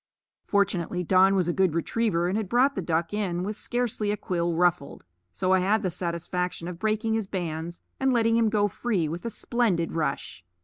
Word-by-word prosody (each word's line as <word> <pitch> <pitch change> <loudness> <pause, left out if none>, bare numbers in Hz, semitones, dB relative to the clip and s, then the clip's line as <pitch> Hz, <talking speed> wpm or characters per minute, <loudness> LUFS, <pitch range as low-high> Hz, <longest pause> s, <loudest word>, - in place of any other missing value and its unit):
Fortunately 185 -3 0
Don 190 +2 +4
was 185 -3 +1
a 175 - +1
good 185 -4 +2
retriever 175 0 0
and 185 - -1
had 215 -3 -2
brought 255 +4 +3
the 195 - -3
duck 165 +1 -1
in 185 -4 -1
with 210 +3 -3
scarcely 240 -3 -1
a 210 - 0
quill 170 -3 -1
ruffled; 175 - 0 0.3
so 185 - 0
I 190 - +5
had 210 +4 +1
the 185 - 0
satisfaction 175 0 -3
of 175 -1 -7
breaking 220 +1 0
his 220 -3 -1
bands 170 -2 -4 0.2
and 265 0 +2
letting 230 -2 +3
him 230 -1 +3
go 210 -1 +2
free 205 -5 -1
with 170 +8 -5
a - - -1
splendid 215 -6 0
rush. 145 - -3
185 Hz, 200 wpm, -26 LUFS, 170-215 Hz, 0.3 s, I